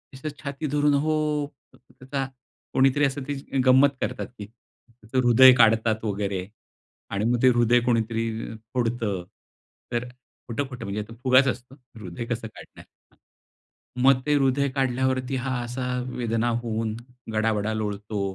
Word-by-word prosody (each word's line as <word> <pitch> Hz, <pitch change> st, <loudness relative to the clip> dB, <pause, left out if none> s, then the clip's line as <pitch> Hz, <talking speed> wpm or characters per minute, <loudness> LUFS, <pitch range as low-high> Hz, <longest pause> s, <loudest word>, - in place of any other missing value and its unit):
असं 135 Hz, +4 st, -5 dB
छाती 145 Hz, +1 st, -4 dB
धरून, 145 Hz, +1 st, +2 dB
"हो" 150 Hz, 0 st, 0 dB, 0.3 s
त्याचा 130 Hz, +2 st, -6 dB, 0.5 s
कोणीतरी 135 Hz, +2 st, +4 dB
असं 135 Hz, 0 st, -2 dB
त्याची 140 Hz, 0 st, -5 dB
अ, -, -, +2 dB
गंमत 130 Hz, +2 st, +6 dB
करतात -, -, -3 dB
ती. 110 Hz, -4 st, -10 dB
त्याचं 115 Hz, +2 st, -5 dB
हृदय 130 Hz, +2 st, +9 dB
काढतात 110 Hz, 0 st, +3 dB
वगैरे 100 Hz, -3 st, -2 dB, 0.6 s
आणि 100 Hz, +2 st, -1 dB
मग 120 Hz, 0 st, +1 dB
ते 130 Hz, -, +8 dB
हृदय 120 Hz, 0 st, +4 dB
कोणीतरी 115 Hz, -1 st, 0 dB, 0.4 s
फोडतं. 115 Hz, -6 st, -1 dB, 0.7 s
तर 120 Hz, 0 st, -2 dB, 0.4 s
खोटं-खोटं 130 Hz, +1 st, -4 dB
म्हणजे 100 Hz, +2 st, -3 dB
तो -, -, -9 dB
फुगाच 130 Hz, +1 st, +5 dB
असतो. 125 Hz, +1 st, -4 dB, 0.2 s
हृदय 105 Hz, 0 st, -7 dB
कसं 115 Hz, -1 st, -3 dB
काढणार? 110 Hz, -, -14 dB, 0.3 s
हां. -, -, -30 dB, 0.9 s
मग 135 Hz, -1 st, +5 dB
ते 150 Hz, -, +2 dB
हृदय 140 Hz, 0 st, +2 dB
काढल्यावरती 130 Hz, 0 st, 0 dB
हा 130 Hz, -1 st, -1 dB
असा 125 Hz, +1 st, -4 dB, 0.3 s
वेदना 115 Hz, -1 st, 0 dB
होऊन 110 Hz, -1 st, -2 dB, 0.4 s
गडाबडा 110 Hz, -1 st, 0 dB
लोळतो 105 Hz, -1 st, -3 dB
120 Hz, 135 wpm, -25 LUFS, 110-135 Hz, 0.9 s, हृदय